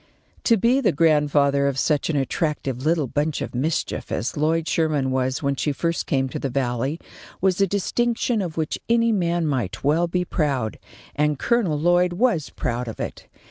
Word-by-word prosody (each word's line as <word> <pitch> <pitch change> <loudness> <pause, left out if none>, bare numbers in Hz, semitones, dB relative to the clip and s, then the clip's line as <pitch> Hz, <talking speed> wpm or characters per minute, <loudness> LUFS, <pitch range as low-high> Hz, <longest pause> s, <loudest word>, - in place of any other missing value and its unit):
To 230 - +5
be 240 +6 +3
the 235 - +3
grandfather 145 -2 +3
of 140 -1 -1
such 150 +2 +1
an 160 - 0
attractive 135 -2 -1
little 160 -1 +2
bunch 145 +4 -1
of - - -5
mischief 150 +6 -2
as 110 +5 -2
Lloyd 160 +2 +1
Sherman 150 -5 +1
was 130 +2 -1
when 140 0 +1
she 145 - -1
first 165 +4 -2
came 135 -2 +1
to - - -5
the 135 - -2
Valley 130 +3 -1 0.4
was 190 0 +1
a 195 - +4
distinction 230 +4 0
of 170 -4 -5
which 155 -2 -2
any 230 0 +3
man 175 -4 +1
might 130 -10 -2
well 160 +5 +2
be 180 +1 -1
proud, 140 -10 -1 0.4
and 150 0 +1
Colonel 205 - +1
Lloyd 175 +3 +3
was 180 - +1
proud 125 0 -3
of 115 - -7
it. - - -6
155 Hz, 180 wpm, -23 LUFS, 140-175 Hz, 0.4 s, To